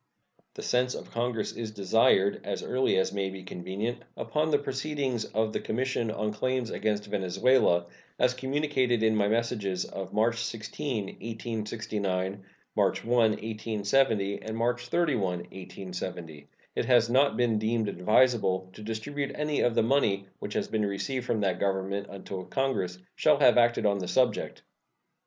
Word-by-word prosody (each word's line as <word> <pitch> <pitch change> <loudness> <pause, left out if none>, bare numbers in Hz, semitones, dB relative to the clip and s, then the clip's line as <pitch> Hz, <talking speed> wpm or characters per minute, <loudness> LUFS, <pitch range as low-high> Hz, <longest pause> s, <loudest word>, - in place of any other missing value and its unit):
The - - -7
sense 125 +1 +1
of - - -9
Congress 115 -1 -1
is 115 -2 -5
desired, 100 0 +3
as - - -3
early 130 +1 +1
as 95 0 +1
may 100 -1 -1
be 95 0 -8
convenient, 95 +6 -4 0.2
upon 155 +1 0
the 145 - +4
proceedings 135 -3 -2
of 110 +1 -1
the - - 0
commission 125 -1 -1
on 105 0 -2
claims 130 +2 -1
against 105 -1 -1
Venezuela, 95 -1 +2 0.3
as 125 0 +3
communicated 130 -3 0
in 110 0 +3
my 100 -1 +2
messages 105 -4 0
of 95 -1 -6
March 115 +2 +2
16, 115 +1 -3
1869, 105 -3 -3 0.3
March - - +1
1, 120 - 0
1870, 110 -1 +1
and 110 0 -5
March 120 +1 0
31, 155 -9 +1 0.3
1870. 90 -5 -7 0.3
It - - 0
has 120 -3 +5
not 135 +4 +3
been 115 -3 +2
deemed 110 0 0
advisable 100 -1 +2
to - - -11
distribute 135 +6 -3
any 150 -1 -1
of 120 -2 +2
the 115 - +4
money 110 -6 +2
which - - -6
has - - 0
been 110 -1 0
received 120 +6 -2
from 110 - +1
that 95 -3 0
Government 100 +1 -1
until 95 -1 -6
Congress 105 -10 -1 0.2
shall 150 -2 +4
have 125 -5 +6
acted 120 -2 +3
on 100 -1 +2
the 90 - -4
subject. 125 +8 +1
110 Hz, 155 wpm, -28 LUFS, 100-125 Hz, 0.3 s, have